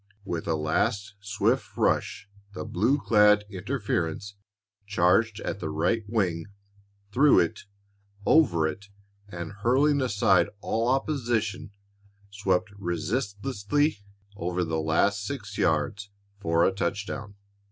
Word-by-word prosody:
With 85 Hz, -4 st, -4 dB
a 80 Hz, -, +1 dB
last 100 Hz, +6 st, 0 dB
swift 100 Hz, 0 st, -1 dB
rush 95 Hz, -, 0 dB, 0.3 s
the -, -, -5 dB
blue 115 Hz, +10 st, +1 dB
clad 105 Hz, -5 st, +4 dB
interference 100 Hz, -3 st, -2 dB, 0.5 s
charged 100 Hz, +3 st, +2 dB
at -, -, -4 dB
the 80 Hz, -, -4 dB
right 95 Hz, +9 st, 0 dB
wing, 90 Hz, -7 st, -1 dB, 0.6 s
through 140 Hz, +6 st, +5 dB
it, 85 Hz, -, -3 dB, 0.6 s
over 85 Hz, -, +4 dB
it, 100 Hz, +6 st, -6 dB, 0.4 s
and, 85 Hz, -3 st, -6 dB
hurling 135 Hz, +8 st, +2 dB
aside 100 Hz, -7 st, +3 dB
all 115 Hz, +3 st, -1 dB
opposition, 120 Hz, -7 st, -1 dB, 0.6 s
swept 100 Hz, -1 st, 0 dB
resistlessly 105 Hz, -, -1 dB, 0.4 s
over 90 Hz, -1 st, -2 dB
the 80 Hz, -1 st, -1 dB
last 100 Hz, +6 st, +1 dB
six 100 Hz, -4 st, -6 dB
yards 90 Hz, +6 st, 0 dB, 0.3 s
for 85 Hz, -3 st, +2 dB
a -, -, +3 dB
touchdown. 100 Hz, +1 st, -4 dB
100 Hz, 110 wpm, -27 LUFS, 85-115 Hz, 0.6 s, through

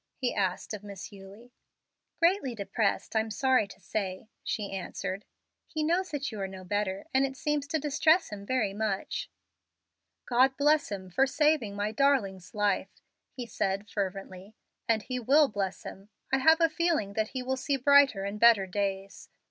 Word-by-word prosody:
he 250 Hz, -, -1 dB
asked 190 Hz, 0 st, -1 dB
of 210 Hz, -1 st, -6 dB
Miss 200 Hz, -1 st, -9 dB
Eulie. 200 Hz, +5 st, -13 dB, 0.7 s
"Greatly 335 Hz, -7 st, +2 dB
depressed, 200 Hz, +1 st, -1 dB
I'm 220 Hz, 0 st, +1 dB
sorry 255 Hz, 0 st, +2 dB
to -, -, -14 dB
say," 190 Hz, +1 st, -4 dB
she 205 Hz, -2 st, -3 dB
answered. 190 Hz, +1 st, -5 dB, 0.4 s
"He 310 Hz, -1 st, -3 dB
knows 350 Hz, +4 st, +1 dB
that 285 Hz, -3 st, -3 dB
you 215 Hz, -, -7 dB
are 195 Hz, -, -1 dB
no 190 Hz, -1 st, -9 dB
better, 195 Hz, 0 st, -2 dB
and 265 Hz, +1 st, +4 dB
it 270 Hz, -1 st, -2 dB
seems 295 Hz, -1 st, -1 dB
to 315 Hz, -, 0 dB
distress 310 Hz, +4 st, +2 dB
him 205 Hz, -1 st, -7 dB
very 215 Hz, -3 st, 0 dB
much." 205 Hz, -2 st, -2 dB, 1.0 s
"God 260 Hz, +2 st, +3 dB
bless 295 Hz, -3 st, +3 dB
him 190 Hz, -2 st, -6 dB
for 270 Hz, +9 st, +3 dB
saving 295 Hz, -8 st, +1 dB
my 205 Hz, +1 st, -1 dB
darling's 220 Hz, -9 st, 0 dB
life!" 205 Hz, -2 st, -1 dB, 0.3 s
he 250 Hz, -2 st, -7 dB
said, 200 Hz, -2 st, -2 dB
fervently; 195 Hz, 0 st, -5 dB, 0.3 s
"and 220 Hz, -2 st, +2 dB
He 255 Hz, -1 st, -3 dB
will 280 Hz, +5 st, +5 dB
bless 195 Hz, -2 st, -3 dB
him. 195 Hz, +2 st, -10 dB, 0.2 s
I 270 Hz, -, +4 dB
have 320 Hz, +5 st, +5 dB
a 330 Hz, -, +5 dB
feeling 320 Hz, -, 0 dB
that 220 Hz, +1 st, 0 dB
he 255 Hz, -, -2 dB
will 260 Hz, +1 st, -1 dB
see 275 Hz, +2 st, -1 dB
brighter 275 Hz, -6 st, +5 dB
and 200 Hz, +2 st, -4 dB
better 230 Hz, -4 st, +6 dB
days. 195 Hz, 0 st, -4 dB
220 Hz, 170 wpm, -29 LUFS, 195-275 Hz, 1.0 s, better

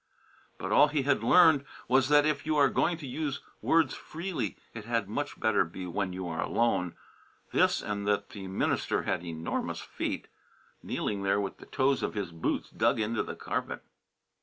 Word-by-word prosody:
But -, -, -4 dB
all 150 Hz, -, +7 dB
he 145 Hz, -2 st, 0 dB
had 135 Hz, -4 st, +2 dB
learned 160 Hz, +1 st, +6 dB, 0.2 s
was 130 Hz, +2 st, +3 dB
that 145 Hz, 0 st, +6 dB
if 150 Hz, -2 st, 0 dB
you 155 Hz, -1 st, 0 dB
are 140 Hz, -2 st, +5 dB
going 170 Hz, +5 st, +1 dB
to 155 Hz, -, -8 dB
use 140 Hz, +1 st, -3 dB, 0.2 s
words 165 Hz, -1 st, +3 dB
freely 175 Hz, +3 st, -4 dB, 0.2 s
it 115 Hz, -2 st, -8 dB
had 115 Hz, -3 st, 0 dB
much 145 Hz, +8 st, -4 dB
better 110 Hz, -2 st, +3 dB
be 90 Hz, +2 st, -7 dB
when 95 Hz, +2 st, -2 dB
you 90 Hz, 0 st, -5 dB
are 80 Hz, -1 st, -3 dB
alone; 90 Hz, -7 st, +1 dB, 0.6 s
this, -, -, +3 dB
and 100 Hz, -1 st, -3 dB
that 100 Hz, 0 st, +1 dB
the 95 Hz, -2 st, -7 dB
minister 95 Hz, -, 0 dB
had 85 Hz, -, -1 dB
enormous 80 Hz, -1 st, -3 dB
feet, -, -, -4 dB, 0.5 s
kneeling 100 Hz, -2 st, -2 dB
there 100 Hz, +1 st, +2 dB
with 100 Hz, -1 st, -3 dB
the -, -, -13 dB
toes 135 Hz, 0 st, +1 dB
of -, -, -2 dB
his 100 Hz, -5 st, -3 dB
boots 85 Hz, -1 st, -2 dB
dug -, -, +2 dB
into 110 Hz, +1 st, 0 dB
the -, -, -5 dB
carpet. -, -, -4 dB
115 Hz, 185 wpm, -29 LUFS, 100-145 Hz, 0.6 s, all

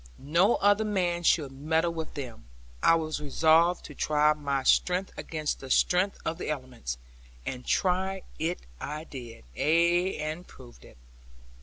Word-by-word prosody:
No 170 Hz, -, +3 dB
other 205 Hz, +2 st, +3 dB
man 180 Hz, -5 st, 0 dB
should 155 Hz, -5 st, +2 dB
meddle 160 Hz, +5 st, 0 dB
with 160 Hz, -1 st, -6 dB
them; 125 Hz, -, -7 dB, 0.4 s
I 165 Hz, -, +6 dB
was 155 Hz, -2 st, -2 dB
resolved 160 Hz, +4 st, +3 dB
to 150 Hz, -, -9 dB
try 150 Hz, +1 st, +3 dB
my 140 Hz, -3 st, -2 dB
strength 180 Hz, +7 st, +2 dB
against 155 Hz, -2 st, -3 dB
the 135 Hz, -, -9 dB
strength 180 Hz, +8 st, +2 dB
of 165 Hz, +2 st, -2 dB
the -, -, -4 dB
elements; 130 Hz, -, -4 dB, 0.5 s
and 125 Hz, -1 st, -5 dB
try 190 Hz, +1 st, +1 dB, 0.2 s
it 165 Hz, +3 st, -1 dB, 0.2 s
I 150 Hz, +2 st, -5 dB
did, 120 Hz, -, -10 dB
ay, 170 Hz, +5 st, +2 dB
and 155 Hz, +3 st, -4 dB
proved 120 Hz, -2 st, -15 dB
it. -, -, -16 dB
160 Hz, 150 wpm, -28 LUFS, 140-175 Hz, 0.5 s, I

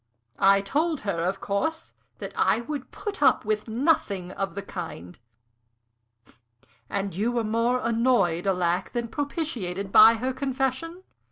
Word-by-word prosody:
I 195 Hz, 0 st, +5 dB
told 305 Hz, +9 st, -1 dB
her, 185 Hz, -5 st, -2 dB
of 190 Hz, +2 st, -1 dB
course, 260 Hz, +14 st, -2 dB, 0.2 s
that -, -, -6 dB
I -, -, +2 dB
would 275 Hz, +2 st, -6 dB
put 415 Hz, -2 st, -6 dB
up -, -, +4 dB
with 215 Hz, +1 st, -1 dB
nothing 220 Hz, -, 0 dB
of 195 Hz, -2 st, -4 dB
the 200 Hz, -, -4 dB
kind." 90 Hz, -, -8 dB, 1.7 s
"And 195 Hz, -1 st, -2 dB
were 230 Hz, +4 st, 0 dB
more 230 Hz, +3 st, +1 dB
annoyed, 225 Hz, -7 st, +2 dB
alack! 180 Hz, -2 st, 0 dB
than 235 Hz, -1 st, -2 dB
propitiated 230 Hz, -, -3 dB
by 220 Hz, +3 st, +8 dB
her 255 Hz, +3 st, -2 dB
confession?" 270 Hz, +6 st, -2 dB
225 Hz, 135 wpm, -26 LUFS, 195-260 Hz, 1.7 s, by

